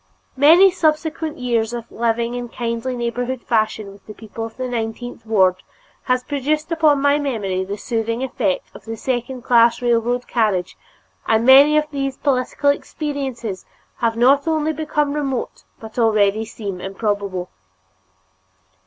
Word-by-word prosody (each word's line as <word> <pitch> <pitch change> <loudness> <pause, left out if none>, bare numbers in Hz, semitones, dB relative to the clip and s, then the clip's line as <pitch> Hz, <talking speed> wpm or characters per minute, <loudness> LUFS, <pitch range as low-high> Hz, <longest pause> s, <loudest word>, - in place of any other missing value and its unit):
Many 330 +8 +7
subsequent 315 -2 -1
years 235 -2 -1
of 235 -1 -6
living 235 +1 -1
in 245 -1 -5
kindly 235 +2 -3
neighborhood 240 +1 -3
fashion 215 -2 0
with 200 0 -17
the 215 - -9
people 225 +1 -8
of 225 - -17
the 255 0 -3
nineteenth 230 0 -5
ward 190 -4 +3 0.5
has 255 -1 +1
produced 300 +4 -2
upon 310 -3 +3
my 285 +1 +3
memory 205 -10 -2
the 200 +2 -5
soothing 230 +3 -2
effect 215 -7 -2
of - - -13
the 225 0 -6
second 250 +1 -3
class 235 -2 +4
railroad 240 0 0
carriage 200 - 0 0.5
and 225 +1 +2
many 280 +4 +7
of 305 - +2
these 275 -2 -3
political 280 +1 +1
experiences 270 - -4 0.3
have 230 -1 0
not 275 +5 +4
only 315 -1 +1
become 300 -1 -1
remote 275 -4 -3
but 220 +2 -8
already 215 -1 +2
seem 200 -4 -6
improbable. 195 -2 -3
240 Hz, 145 wpm, -20 LUFS, 220-280 Hz, 0.5 s, Many